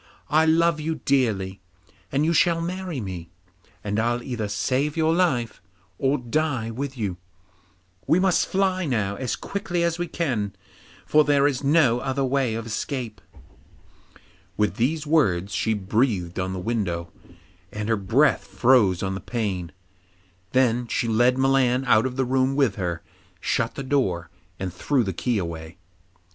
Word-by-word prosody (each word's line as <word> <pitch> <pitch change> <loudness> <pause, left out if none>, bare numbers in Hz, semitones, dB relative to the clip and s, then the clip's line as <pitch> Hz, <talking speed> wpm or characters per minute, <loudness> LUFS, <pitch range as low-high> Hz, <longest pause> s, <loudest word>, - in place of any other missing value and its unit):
I 160 +1 +4
love 165 0 +3
you 160 +1 -2
dearly, 105 -10 0 0.5
and 140 +3 +1
you 165 - +2
shall 170 +1 +3
marry 180 -2 -4
me, 90 -6 -6 0.5
and 105 +1 -1
I'll 120 +2 0
either 120 -5 -3
save 135 +8 -1
your 160 0 +3
life 135 -11 0 0.4
or 135 +2 +2
die 125 -2 -1
with 135 +3 -5
you. 100 -6 -2 0.9
We 165 - +4
must 185 -1 +2
fly 190 -1 +1
now 105 -6 0
as 130 -3 -2
quickly 180 -3 -3
as 170 0 0
we 175 - -1
can, 120 - -2 0.5
for 155 0 +5
there 145 -1 +3
is 145 -2 0
no 140 -5 +4
other 135 +2 -1
way 130 -3 0
of 115 0 -4
escape.' 120 +2 -4 1.4
With 105 +2 0
these 150 +6 0
words 100 - +2
she 110 -1 0
breathed 100 -3 0
on 95 0 -2
the 95 - -4
window, 90 -5 -2 0.6
and 105 0 -4
her 115 - +2
breath 115 +7 +2
froze 100 -2 +3
on 95 0 -1
the 95 - -5
pane. 95 -8 -3 0.8
Then 125 -2 +2
she 115 - -1
led 120 +3 +3
Milan 130 -1 +2
out 115 -1 +4
of 125 - -6
the 130 0 0
room 130 +1 +1
with 135 -7 +3
her, 85 -4 -3 0.4
shut 115 +5 -1
the 135 - -4
door, 95 -12 0 0.3
and 95 -2 -4
threw 140 -4 +1
the 95 -3 -3
key 120 +6 -1
away. 85 -2 -5
125 Hz, 155 wpm, -24 LUFS, 105-145 Hz, 1.4 s, for